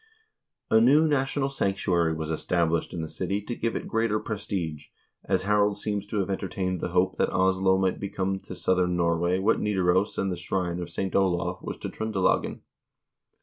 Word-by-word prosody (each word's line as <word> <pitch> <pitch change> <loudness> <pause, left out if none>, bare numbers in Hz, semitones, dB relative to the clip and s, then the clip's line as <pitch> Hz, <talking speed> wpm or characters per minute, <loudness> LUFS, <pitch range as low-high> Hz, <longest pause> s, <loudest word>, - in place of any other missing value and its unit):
A 110 - +6
new 145 +7 +5
national 135 -1 0
sanctuary 90 -8 +1
was 80 0 -4
established 85 0 0
in 85 -2 -4
the - - -4
city 95 +5 -2
to 120 - -4
give 115 0 -2
it - - -4
greater 115 -1 +1
prestige, 95 -9 -4 0.4
as - - +1
Harald 105 0 +2
seems 105 -1 -3
to 105 - -3
have 95 - -3
entertained 95 -1 -2
the - - -1
hope 90 +1 +1
that - - +2
Oslo 95 0 +3
might 95 -1 0
become 95 -1 -2
to - - -9
southern 90 -1 +1
Norway 85 +1 +1
what 100 +4 +2
Nidaros 95 -1 +1
and 95 - 0
the 90 - -3
shrine 90 -2 -2
of 85 -1 -5
St. 95 +3 -3
Olav 95 -3 +1
was - - -5
to - - -5
Tr0ndelagen. 110 -4 0
95 Hz, 180 wpm, -27 LUFS, 90-105 Hz, 0.4 s, A